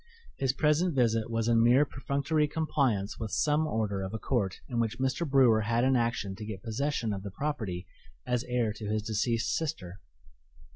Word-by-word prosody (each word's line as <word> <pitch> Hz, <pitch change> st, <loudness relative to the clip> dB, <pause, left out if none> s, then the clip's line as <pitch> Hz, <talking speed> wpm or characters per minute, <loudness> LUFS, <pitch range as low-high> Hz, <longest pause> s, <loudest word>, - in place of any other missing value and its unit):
His 135 Hz, -2 st, +1 dB
present 150 Hz, +4 st, +2 dB
visit 115 Hz, -3 st, +2 dB
was 115 Hz, -1 st, -1 dB
in 115 Hz, -1 st, +4 dB
mere 125 Hz, +5 st, +5 dB
perfunctory 140 Hz, +3 st, 0 dB
compliance 135 Hz, -10 st, 0 dB
with 110 Hz, -, -3 dB
some 150 Hz, +7 st, +1 dB
order 105 Hz, -6 st, -1 dB
of 95 Hz, +3 st, -4 dB
a -, -, -1 dB
court 105 Hz, -5 st, -1 dB
in 120 Hz, -, -2 dB
which 115 Hz, 0 st, -1 dB
Mr. 130 Hz, +5 st, -1 dB
Brewer 125 Hz, -5 st, +5 dB
had 115 Hz, +3 st, +1 dB
an 130 Hz, 0 st, +3 dB
action 115 Hz, -5 st, 0 dB
to 110 Hz, -, -7 dB
get 105 Hz, -3 st, -7 dB
possession 115 Hz, -1 st, -1 dB
of 100 Hz, -, -4 dB
the 100 Hz, -, -6 dB
property 105 Hz, -8 st, -3 dB, 0.4 s
as 125 Hz, -1 st, 0 dB
heir 120 Hz, -3 st, 0 dB
to 105 Hz, 0 st, -7 dB
his 105 Hz, 0 st, -1 dB
deceased 115 Hz, +2 st, 0 dB
sister. 100 Hz, -, -4 dB
115 Hz, 185 wpm, -29 LUFS, 110-140 Hz, 0.4 s, mere